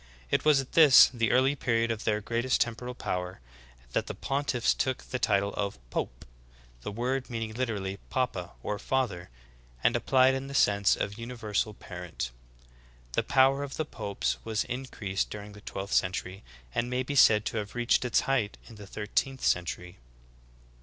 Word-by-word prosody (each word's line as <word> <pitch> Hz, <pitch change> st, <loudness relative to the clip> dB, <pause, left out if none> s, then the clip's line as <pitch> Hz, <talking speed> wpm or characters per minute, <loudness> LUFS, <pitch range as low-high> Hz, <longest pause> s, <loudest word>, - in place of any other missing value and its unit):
It -, -, +2 dB
was 150 Hz, -2 st, +5 dB
at 135 Hz, -, -5 dB
this, 150 Hz, -6 st, +8 dB
the 115 Hz, -2 st, +1 dB
early 130 Hz, +3 st, +3 dB
period 115 Hz, -3 st, +1 dB
of 110 Hz, -1 st, -4 dB
their 105 Hz, -1 st, +1 dB
greatest 120 Hz, +4 st, 0 dB
temporal 120 Hz, +1 st, -2 dB
power, 90 Hz, -5 st, -3 dB, 0.5 s
that -, -, -1 dB
the -, -, -5 dB
pontiffs 135 Hz, -3 st, 0 dB
took 130 Hz, -1 st, -1 dB
the 125 Hz, -, -4 dB
title 100 Hz, -4 st, +1 dB
of 100 Hz, -6 st, -2 dB
Pope, -, -, -4 dB, 0.6 s
the 105 Hz, -, -5 dB
word 125 Hz, +5 st, -2 dB
meaning 115 Hz, -2 st, -4 dB
literally 105 Hz, -6 st, -2 dB
papa, 95 Hz, -9 st, -2 dB
or 105 Hz, -1 st, -2 dB
father, 110 Hz, -10 st, -1 dB, 0.5 s
and -, -, +4 dB
applied 130 Hz, 0 st, +4 dB
in 135 Hz, +1 st, -3 dB
the 140 Hz, -, -7 dB
sense 100 Hz, -5 st, +4 dB
of 100 Hz, +2 st, -4 dB
universal 110 Hz, -3 st, -2 dB
parent. 85 Hz, -12 st, -6 dB, 0.8 s
The -, -, +1 dB
power 135 Hz, 0 st, +4 dB
of 140 Hz, -1 st, -5 dB
the 155 Hz, -, -1 dB
popes 105 Hz, -8 st, -2 dB
was 110 Hz, -1 st, -1 dB
increased 120 Hz, -7 st, -3 dB
during 105 Hz, 0 st, -8 dB
the 105 Hz, -, -13 dB
twelfth 100 Hz, 0 st, -5 dB
century, 95 Hz, +1 st, 0 dB, 0.3 s
and 120 Hz, -, -1 dB
may 125 Hz, +1 st, 0 dB
be 145 Hz, -, -4 dB
said 110 Hz, -6 st, +6 dB
to -, -, -2 dB
have 105 Hz, +1 st, -4 dB
reached 120 Hz, +1 st, +2 dB
its 125 Hz, -, +2 dB
height 125 Hz, -6 st, 0 dB
in 115 Hz, -, -13 dB
the 105 Hz, -1 st, -10 dB
thirteenth 125 Hz, +6 st, -2 dB
century. 90 Hz, -1 st, -1 dB
115 Hz, 170 wpm, -29 LUFS, 100-130 Hz, 0.8 s, this